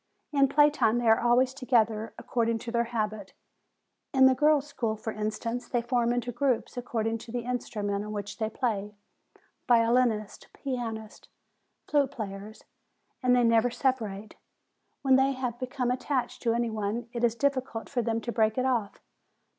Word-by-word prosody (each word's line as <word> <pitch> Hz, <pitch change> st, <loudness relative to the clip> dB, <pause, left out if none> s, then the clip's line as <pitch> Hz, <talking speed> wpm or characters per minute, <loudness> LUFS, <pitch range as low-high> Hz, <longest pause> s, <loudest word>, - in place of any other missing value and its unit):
In 275 Hz, -1 st, +5 dB
play 295 Hz, +2 st, +5 dB
time 235 Hz, -5 st, +2 dB
they 240 Hz, -1 st, 0 dB
are 225 Hz, 0 st, +6 dB
always 245 Hz, +2 st, +3 dB
together, 225 Hz, -4 st, +1 dB
according 230 Hz, -1 st, 0 dB
to 230 Hz, +1 st, -7 dB
their 235 Hz, 0 st, +1 dB
habit. 215 Hz, -4 st, -3 dB, 0.8 s
In 265 Hz, 0 st, +7 dB
the 260 Hz, -, +7 dB
girls' 295 Hz, +1 st, +3 dB
school, 230 Hz, -6 st, -2 dB
for 220 Hz, +1 st, -5 dB
instance, 225 Hz, +3 st, -3 dB
they 240 Hz, -2 st, -1 dB
form 240 Hz, -1 st, +1 dB
into 245 Hz, 0 st, -1 dB
groups 245 Hz, 0 st, 0 dB
according 230 Hz, -2 st, -2 dB
to 235 Hz, 0 st, -10 dB
the 245 Hz, 0 st, -2 dB
instrument 210 Hz, -5 st, -2 dB
on 210 Hz, -, -6 dB
which 205 Hz, 0 st, -5 dB
they 220 Hz, -1 st, 0 dB
play, 210 Hz, -3 st, -2 dB, 0.7 s
violinists, 230 Hz, -3 st, +2 dB
pianists, 225 Hz, -5 st, -5 dB
and -, -, -33 dB
flute 285 Hz, -3 st, +3 dB
players, 210 Hz, -3 st, -7 dB, 0.6 s
and 250 Hz, -1 st, +4 dB
they 245 Hz, -, +4 dB
never 230 Hz, +1 st, +4 dB
separate. 220 Hz, -5 st, -2 dB, 0.7 s
When 265 Hz, -1 st, +5 dB
they 270 Hz, +1 st, +3 dB
have 250 Hz, -2 st, -4 dB
become 250 Hz, -1 st, -2 dB
attached 255 Hz, 0 st, -2 dB
to 230 Hz, -2 st, +1 dB
any 235 Hz, -1 st, 0 dB
one, 220 Hz, +2 st, -3 dB
it 240 Hz, 0 st, -3 dB
is 235 Hz, -1 st, +3 dB
difficult 260 Hz, -4 st, -1 dB
for 250 Hz, -3 st, -1 dB
them 230 Hz, 0 st, -1 dB
to 235 Hz, -, -4 dB
break 220 Hz, -1 st, +1 dB
it 255 Hz, -, +1 dB
off. 235 Hz, -6 st, -1 dB
235 Hz, 170 wpm, -28 LUFS, 220-255 Hz, 0.8 s, In